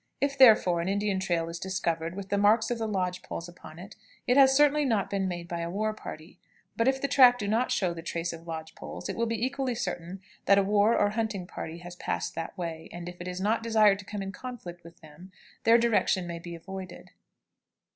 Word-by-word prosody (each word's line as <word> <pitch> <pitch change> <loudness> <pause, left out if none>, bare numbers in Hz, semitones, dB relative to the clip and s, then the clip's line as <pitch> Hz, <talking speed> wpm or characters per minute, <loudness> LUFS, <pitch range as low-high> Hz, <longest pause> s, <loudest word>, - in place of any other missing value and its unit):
If, 280 0 0
therefore, 215 -10 +6
an 170 - -3
Indian 200 -1 0
trail 175 -3 -1
is 170 0 -6
discovered 170 -3 -2
with 195 -1 -7
the 200 - +1
marks 220 +3 +3
of 240 - -2
the 225 - -1
lodge 180 -3 -2
poles 170 - -6
upon 170 -2 -13
it, 185 +3 -11 0.3
it 250 - +2
has 265 -1 +6
certainly 295 0 +4
not 225 -7 0
been 195 -1 0
made 175 -1 -5
by 170 0 -4
a 170 0 -3
war 215 +4 -1
party; 170 -4 -10 0.4
but 230 - +1
if 265 0 +2
the 280 - -1
track 255 -3 +6
do 205 - -4
not 225 +4 +1
show 180 -3 0
the 165 - -8
trace 170 0 -3
of 165 +1 -11
lodge 160 -1 -6
poles, - - -8
it - - -3
will 230 0 0
be 230 +1 -1
equally 265 -2 -2
certain 175 -2 -4 0.3
that 200 - +5
a 200 - +4
war 205 +3 +3
or 205 0 +2
hunting 215 -4 -2
party 165 -1 -7
has 175 0 -10
passed - - -3
that 165 +4 -6
way, 165 -2 -5
and 175 0 -7
if 175 0 -9
it 175 - -6
is 180 0 -4
not 215 +4 +1
desired 215 -3 +4
to 205 - -10
come 205 -1 -5
in 195 - -5
conflict 205 -8 -9
with 170 0 -15
them, 160 +4 -14 0.3
their 230 +1 +7
direction 225 -5 +2
may 170 -1 -5
be 170 0 -8
avoided. 185 +1 -9
195 Hz, 235 wpm, -28 LUFS, 175-225 Hz, 0.4 s, their